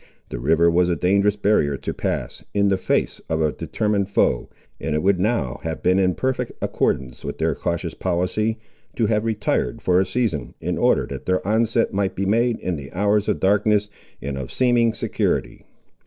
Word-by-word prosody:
The -, -, -5 dB
river 85 Hz, +6 st, +3 dB
was 90 Hz, +1 st, +3 dB
a 85 Hz, -, +2 dB
dangerous 100 Hz, +5 st, +2 dB
barrier 100 Hz, -9 st, +2 dB
to -, -, -4 dB
pass, -, -, -3 dB
in 100 Hz, 0 st, +3 dB
the 95 Hz, -, +2 dB
face -, -, 0 dB
of 80 Hz, -, 0 dB
a 80 Hz, -1 st, +2 dB
determined 100 Hz, +7 st, -1 dB
foe, 65 Hz, -10 st, +1 dB, 0.3 s
and 80 Hz, -, -2 dB
it 75 Hz, -, 0 dB
would 95 Hz, -1 st, +3 dB
now 100 Hz, -, 0 dB
have 80 Hz, -1 st, -5 dB
been 90 Hz, +1 st, +3 dB
in 90 Hz, -2 st, +2 dB
perfect 130 Hz, -2 st, -2 dB
accordance 65 Hz, -1 st, -1 dB
with -, -, -5 dB
their -, -, +1 dB
cautious 85 Hz, -1 st, -3 dB
policy, 95 Hz, +5 st, -1 dB, 0.4 s
to 115 Hz, -, +1 dB
have 105 Hz, 0 st, +1 dB
retired 105 Hz, -, -1 dB
for 90 Hz, 0 st, +2 dB
a 95 Hz, -, +2 dB
season, 85 Hz, -, -2 dB
in -, -, -2 dB
order -, -, +3 dB
that -, -, -8 dB
their 95 Hz, 0 st, 0 dB
onset 115 Hz, +1 st, +1 dB
might 95 Hz, -1 st, 0 dB
be 95 Hz, -, -1 dB
made 115 Hz, +3 st, +2 dB
in 90 Hz, -3 st, -2 dB
the 70 Hz, -1 st, -9 dB
hours 105 Hz, +3 st, +1 dB
of -, -, 0 dB
darkness, 105 Hz, +1 st, +2 dB, 0.3 s
and 70 Hz, 0 st, -3 dB
of 65 Hz, -, -6 dB
seeming 120 Hz, -2 st, +3 dB
security. -, -, -2 dB
95 Hz, 190 wpm, -22 LUFS, 85-105 Hz, 0.4 s, river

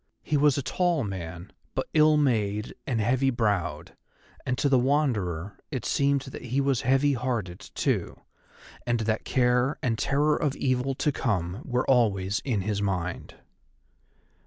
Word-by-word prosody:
He 155 Hz, -, -1 dB
was 145 Hz, -1 st, +4 dB
a 140 Hz, -, -1 dB
tall 175 Hz, +2 st, +1 dB
man, 90 Hz, -3 st, -6 dB, 0.2 s
but -, -, -1 dB
ill 155 Hz, -1 st, +5 dB
made 105 Hz, -6 st, 0 dB
and 120 Hz, -4 st, 0 dB
heavy 130 Hz, +5 st, +2 dB
browed, 105 Hz, -7 st, -1 dB, 0.5 s
and 125 Hz, -, 0 dB
to -, -, +1 dB
the 135 Hz, -2 st, +4 dB
Wanderer 105 Hz, -, 0 dB
it 130 Hz, -7 st, -4 dB
seemed 140 Hz, 0 st, +2 dB
that 135 Hz, -, -9 dB
he 125 Hz, +3 st, -1 dB
was 135 Hz, -3 st, +1 dB
heavy 135 Hz, +3 st, +3 dB
hearted 115 Hz, -8 st, -2 dB, 0.2 s
too, -, -, -1 dB, 0.6 s
and 120 Hz, -1 st, 0 dB
that 110 Hz, 0 st, -1 dB
care 125 Hz, +2 st, +2 dB
and 115 Hz, -3 st, 0 dB
terror 145 Hz, +2 st, +2 dB
of 145 Hz, -3 st, -1 dB
evil 130 Hz, +1 st, 0 dB
to 150 Hz, -, +1 dB
come 100 Hz, -6 st, -2 dB
were 125 Hz, -1 st, -1 dB
always 105 Hz, -6 st, +2 dB
in 115 Hz, -8 st, 0 dB
his 100 Hz, +1 st, -2 dB
mind. 90 Hz, -3 st, -3 dB
125 Hz, 155 wpm, -27 LUFS, 105-135 Hz, 0.6 s, ill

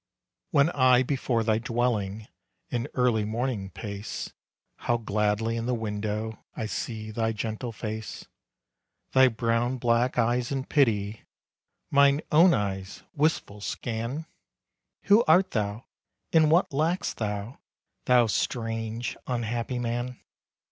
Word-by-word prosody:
When 145 Hz, +4 st, +4 dB
I 130 Hz, -3 st, +5 dB
before 130 Hz, -3 st, 0 dB
thy 110 Hz, -1 st, +2 dB
dwelling, 110 Hz, -3 st, -1 dB, 0.4 s
In 120 Hz, -1 st, -1 dB
early 125 Hz, -4 st, +2 dB
morning 110 Hz, -2 st, -2 dB
pace, 100 Hz, +1 st, -6 dB, 0.4 s
How 120 Hz, -, 0 dB
gladly 110 Hz, +1 st, 0 dB
in 115 Hz, 0 st, -3 dB
the 125 Hz, -, +1 dB
window 110 Hz, 0 st, -3 dB
I 110 Hz, -, -3 dB
see 110 Hz, 0 st, -4 dB
thy 115 Hz, +1 st, 0 dB
gentle 110 Hz, +3 st, -4 dB
face. 110 Hz, 0 st, -6 dB, 0.9 s
Thy 130 Hz, 0 st, +6 dB
brown 115 Hz, +1 st, 0 dB
black 120 Hz, +1 st, +1 dB
eyes 120 Hz, +3 st, +1 dB
in 135 Hz, -1 st, -2 dB
pity, 110 Hz, -7 st, +1 dB, 0.7 s
Mine 140 Hz, +1 st, +5 dB
own 170 Hz, +4 st, +7 dB
eyes, 95 Hz, -, -2 dB
wistful 145 Hz, -9 st, 0 dB
scan, 115 Hz, +9 st, -4 dB, 0.8 s
"Who 205 Hz, +3 st, +5 dB
art 185 Hz, +4 st, +4 dB
thou, 105 Hz, +1 st, -2 dB, 0.5 s
and 160 Hz, -2 st, +5 dB
what 170 Hz, +4 st, +3 dB
lack'st 165 Hz, +7 st, 0 dB
thou, 105 Hz, +2 st, -4 dB, 0.5 s
Thou 125 Hz, -1 st, +5 dB
strange, 115 Hz, +1 st, -2 dB
unhappy 120 Hz, 0 st, -2 dB
man?" 120 Hz, +1 st, -3 dB
115 Hz, 120 wpm, -27 LUFS, 110-130 Hz, 0.9 s, own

